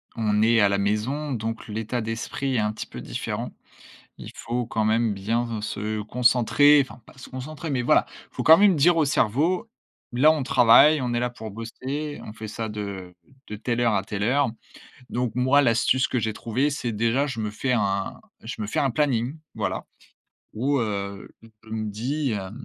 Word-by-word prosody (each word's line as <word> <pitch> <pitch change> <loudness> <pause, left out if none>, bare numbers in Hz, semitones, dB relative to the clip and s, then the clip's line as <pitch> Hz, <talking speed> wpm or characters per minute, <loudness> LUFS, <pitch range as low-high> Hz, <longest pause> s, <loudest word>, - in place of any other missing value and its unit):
on 105 -2 +1
est 115 +1 +4
à 100 - +5
la 100 - +1
maison, 110 +9 -1
donc 115 -1 -4
l'état 110 +3 -3
d'esprit 115 +4 -3
est - - +2
un 105 0 0
petit - - -7
peu - - -9
différent. - - -4 0.7
Il - - -9
faut 120 +1 -3
quand 110 -1 -1
même 110 0 +2
bien 115 +3 -2
se 105 0 -3
concentrer, 125 +5 +4
enfin 130 -1 -11
pas 135 - -18
se 125 - -11
concentrer, 150 +5 -7
mais 130 -3 0
voilà, - - +3
il - - -17
faut - - -1
quand 160 - +8
même 200 0 +5
dire 165 +4 +4
au 160 - +3
cerveau: 150 - +1 0.4
«Là, 130 +6 +5
on 155 -3 -2
travaille, 135 +4 +6
on 125 - -2
est 120 - +1
là 125 0 -1
pour 110 -2 -8
bosser, 130 +7 -5
on 105 - -8
fait 110 0 -8
ça 110 +1 -4
de 100 -4 -6 0.3
de 105 - -5
telle 120 +3 -2
heure 115 -3 +2
à 100 - +1
telle 100 0 -5
heure». 135 +6 +2 0.6
Donc 120 -2 -2
moi, 130 +3 +4
l'astuce 125 +1 +2
que 125 - -1
j'ai 110 -1 -1
trouvé, 125 +7 -1
c'est 125 -5 -3
déjà, 115 +6 +1
je 130 -5 -4
me 105 -1 -2
fais 125 +5 -2
un 100 -4 -1 0.2
je 110 0 -7
me 105 - -2
fais - - -3
un 135 - +2
planning, 135 +1 0 0.2
voilà, - - -3 0.7
où, 135 +6 +1
heu, 100 -2 -4 0.4
je - - -16
me 110 -1 -3
dis 130 +6 -2
heu: 95 -3 -4
115 Hz, 200 wpm, -24 LUFS, 110-135 Hz, 0.7 s, quand